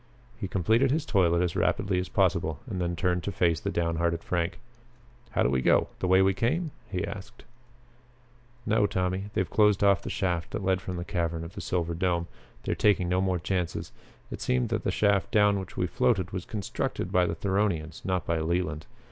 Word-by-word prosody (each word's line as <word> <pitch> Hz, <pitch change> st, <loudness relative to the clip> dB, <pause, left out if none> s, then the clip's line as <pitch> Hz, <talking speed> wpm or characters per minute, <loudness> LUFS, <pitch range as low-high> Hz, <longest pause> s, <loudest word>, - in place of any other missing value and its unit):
He 105 Hz, -3 st, -4 dB
completed 110 Hz, +9 st, +2 dB
his 150 Hz, +3 st, 0 dB
toilet 90 Hz, -, +3 dB
as 90 Hz, -2 st, -1 dB
rapidly 95 Hz, -2 st, +1 dB
as 90 Hz, -, -4 dB
possible 85 Hz, -5 st, +1 dB
and 95 Hz, -8 st, -4 dB
then 85 Hz, 0 st, -1 dB
turned 90 Hz, +1 st, 0 dB
to 100 Hz, -, -3 dB
face 85 Hz, -3 st, +1 dB
the -, -, -3 dB
down 85 Hz, -1 st, -1 dB
hearted 85 Hz, 0 st, 0 dB
Frank. 85 Hz, -2 st, -1 dB, 0.7 s
"How -, -, +1 dB
do -, -, +3 dB
we 65 Hz, -1 st, +1 dB
go? -, -, +3 dB
The 95 Hz, -, -1 dB
way 95 Hz, +1 st, +5 dB
we 95 Hz, 0 st, +3 dB
came?" 150 Hz, -, 0 dB, 0.2 s
he 95 Hz, -1 st, -2 dB
asked. 100 Hz, -1 st, -9 dB, 1.2 s
"No, 105 Hz, -1 st, +3 dB
Tommy. 95 Hz, 0 st, -1 dB
They -, -, +3 dB
have -, -, -4 dB
closed 105 Hz, -2 st, +4 dB
off 100 Hz, -2 st, +4 dB
the -, -, -6 dB
shaft 85 Hz, -3 st, -1 dB
that -, -, -3 dB
led 95 Hz, 0 st, +1 dB
from 95 Hz, -, -5 dB
the 85 Hz, -, -4 dB
cavern 85 Hz, -2 st, -2 dB
of 85 Hz, +2 st, -8 dB
the -, -, -6 dB
silver 85 Hz, -2 st, -1 dB
dome. 85 Hz, 0 st, 0 dB, 0.4 s
They -, -, -2 dB
are -, -, -4 dB
taking 95 Hz, -4 st, +4 dB
no 90 Hz, +1 st, +2 dB
more 95 Hz, -1 st, +1 dB
chances. 90 Hz, 0 st, -2 dB, 0.4 s
It -, -, -6 dB
seems 65 Hz, -1 st, +1 dB
that -, -, -1 dB
the -, -, 0 dB
shaft 100 Hz, -2 st, +2 dB
down 105 Hz, -2 st, +4 dB
which 95 Hz, -2 st, -8 dB
we 90 Hz, -, +1 dB
floated 100 Hz, -2 st, +1 dB
was 95 Hz, -2 st, -4 dB
constructed 105 Hz, -4 st, -3 dB
by 90 Hz, -1 st, +3 dB
the 85 Hz, -, -2 dB
Theronians; 95 Hz, -5 st, -1 dB
not 90 Hz, -4 st, -1 dB
by 85 Hz, -1 st, 0 dB
Leland. 85 Hz, -1 st, -1 dB
90 Hz, 210 wpm, -28 LUFS, 85-100 Hz, 1.2 s, way